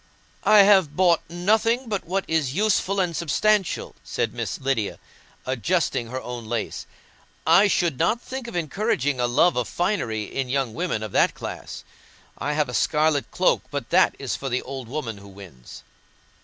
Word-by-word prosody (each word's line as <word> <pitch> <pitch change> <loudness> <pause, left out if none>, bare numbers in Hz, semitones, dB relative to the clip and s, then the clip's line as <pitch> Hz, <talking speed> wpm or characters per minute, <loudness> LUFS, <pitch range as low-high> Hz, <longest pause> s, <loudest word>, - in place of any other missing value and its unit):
"I 210 -1 +8
have 190 -7 +4
bought 175 -2 +4
nothing 220 +8 +1
but 205 -3 -3
what 190 +3 -2
is 155 -4 0
useful 200 -1 +1
and 175 -3 0
substantial," 195 +5 +1
said - - -2
Miss - - -4
Lydia, 130 -6 -1 0.5
adjusting 130 0 0
her 130 +3 -4
own 120 -3 -7
lace; 115 0 -4 0.6
"I 175 +6 +6
should 170 -8 0
not 235 - +2
think 260 0 -7
of 235 - -8
encouraging 155 - -1
a 120 - +2
love 145 +8 +3
of 125 -2 -1
finery 150 - -1
in 130 +4 -4
young 135 -3 -1
women 165 -6 -2
of 110 - -5
that - - +3
class. - - -7 0.6
I 150 - -1
have 150 -1 +1
a 125 - -7
scarlet 150 +2 +1
cloak, - - +2
but - - -5
that - - +4
is - - -3
for 135 - -4
the 125 +1 -1
old 130 -2 -7
woman 115 -6 -5
who 100 - -13
wins." 95 -11 -13
150 Hz, 170 wpm, -24 LUFS, 125-190 Hz, 0.6 s, I